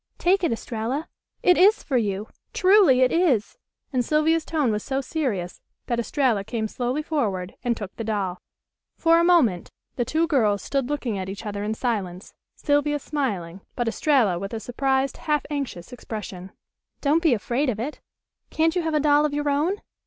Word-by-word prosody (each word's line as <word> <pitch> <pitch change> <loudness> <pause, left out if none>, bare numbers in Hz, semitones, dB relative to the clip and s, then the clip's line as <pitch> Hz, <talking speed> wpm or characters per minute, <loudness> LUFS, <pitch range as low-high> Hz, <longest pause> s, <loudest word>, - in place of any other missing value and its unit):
"Take 375 +2 +2
it, 340 - +2
Estralla! 230 +6 -3 0.4
It 360 -1 +5
is 410 +4 +5
for 275 - -2
you. 210 -3 0 0.3
Truly 370 -9 +5
it 255 - +4
is," 310 - +1 0.3
and 250 -1 +2
Sylvia's 310 +4 +2
tone 300 -8 0
was 210 0 -2
so 270 0 -1
serious 250 - -3 0.2
that 235 -1 -1
Estralla 235 -4 +1
came 220 +1 -3
slowly 250 +6 -2
forward 200 - -2
and 240 -2 0
took 200 -3 -7
the 230 - -5
doll. 200 -5 -2 0.5
For 330 0 +4
a - - +3
moment 295 - +3 0.3
the 245 - +1
two 315 +7 -1
little 335 - +3
girls 205 -3 +1
stood 275 -2 -1
looking 250 -8 -2
at 185 0 -4
each 200 +3 -7
other 205 -1 -4
in 215 +1 -2
silence, 200 -7 -3 0.2
Sylvia 290 0 +1
smiling, 200 - -3
but 240 -2 -1
Estralla 225 - +2
with 195 +4 -5
a - - -3
surprised, 265 +3 -1
half 300 -3 -1
anxious 265 -8 -4
expression. 200 -6 -7 0.5
"Don't 305 +3 +2
be 320 -8 +4
afraid 245 +6 -1
of 215 -4 -2
it. 275 +7 -5 0.5
Can't 325 +2 +1
you 360 - +1
have 320 -2 -1
a - - +3
doll 295 0 +4
of 295 -1 0
your 295 0 0
own?" 325 +8 0
255 Hz, 185 wpm, -24 LUFS, 210-300 Hz, 0.5 s, It